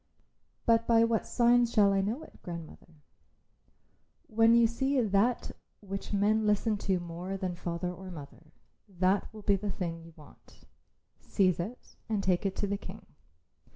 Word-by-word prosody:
"But 230 0 +3
by 230 -1 +5
what 230 -1 0
signs 240 -1 +3
shall 200 -3 +4
I 195 - +2
know 225 +10 -2
it, - - -16
grandmother?" 170 -3 -9 1.4
"When 225 +1 +4
you 235 0 +6
see 265 +4 0
that 220 +2 +1 0.3
which 195 -1 -6
men 210 +1 +2
listen 210 +1 +2
to 185 -2 +3
more 175 +3 -5
than 185 -2 -3
to 175 - -13
father 175 +1 -3
or 185 +1 -10
mother, 155 -1 -11 0.4
that 185 +1 0
will 215 -1 -11
be 200 -1 +3
the 205 +2 -4
thing 170 -3 -4
you 165 0 -14
want. 150 -2 -18 0.6
Seize 185 -4 +1
it 215 +9 -7
and 210 -3 0
take 185 +1 +1
it 190 - -4
to - - -1
the 200 0 -1
King. 200 +2 -10
200 Hz, 165 wpm, -30 LUFS, 180-225 Hz, 1.4 s, you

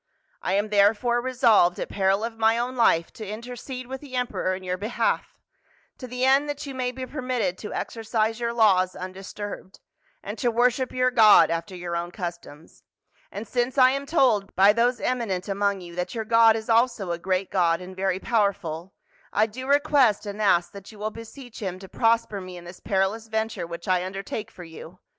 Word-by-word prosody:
I - - -1
am 205 +2 +1
therefore 215 +4 +3
resolved, 235 -8 +3
at - - -3
peril 195 +1 +1
of 230 0 -4
my 225 +1 +3
own 245 +2 -2
life, 170 -9 +2
to 215 - -8
intercede 245 +4 -7
with 265 +1 -7
the 275 -3 -9
emperor 245 -6 -1
in 185 - -9
your 180 0 -2
behalf, 240 - -2 0.6
to 255 - -7
the 250 +1 -1
end 275 +2 +4
that 290 0 -4
you 275 - -6
may 255 -1 -2
be 260 0 -6
permitted 250 -9 -2
to 210 - -7
exercise 225 0 -2
your 235 -1 -1
laws 195 -6 +3
undisturbed, 190 +1 -8 0.4
and - - -6
to 245 - +1
worship 245 +2 +1
your 255 0 +1
God 220 -7 +7
after 170 +3 -3
your 175 -1 -5
own 170 0 -3
customs. 170 -4 -8 0.5
And 210 +2 -7
since 245 +4 -1
I 255 -1 +7
am 275 +1 -3
told 245 -11 +2
by 200 +2 +6
those 240 +2 +1
emi 250 -2 -1
nent 185 -2 -3
among 200 -1 0
you 175 -1 -10
that 180 +6 -3
your 220 -1 -3
God 230 0 +5
is 220 -1 -5
also 230 -5 +2
a 170 - -3
great 185 +1 -1
God 170 -3 +2
and 185 +1 -10
very 190 -1 0
powerful, 195 -6 -1 0.4
I 215 - +3
do 255 +4 -8
request 280 -7 +3
and 205 +1 -5
ask 175 -4 +3
that 200 +1 -11
you 215 - -15
will 215 +1 -3
beseech 230 +2 -11
him 185 -3 -4
to 190 +1 -11
prosper 225 -2 +1
me 185 -1 -9
in 175 - -11
this 175 +1 -11
perilous 200 +2 -1
venture 220 -4 -2
which 170 0 -8
I 180 -1 +2
undertake 195 +3 -5
for 180 - -12
you. 165 +1 -11
215 Hz, 200 wpm, -25 LUFS, 185-245 Hz, 0.6 s, God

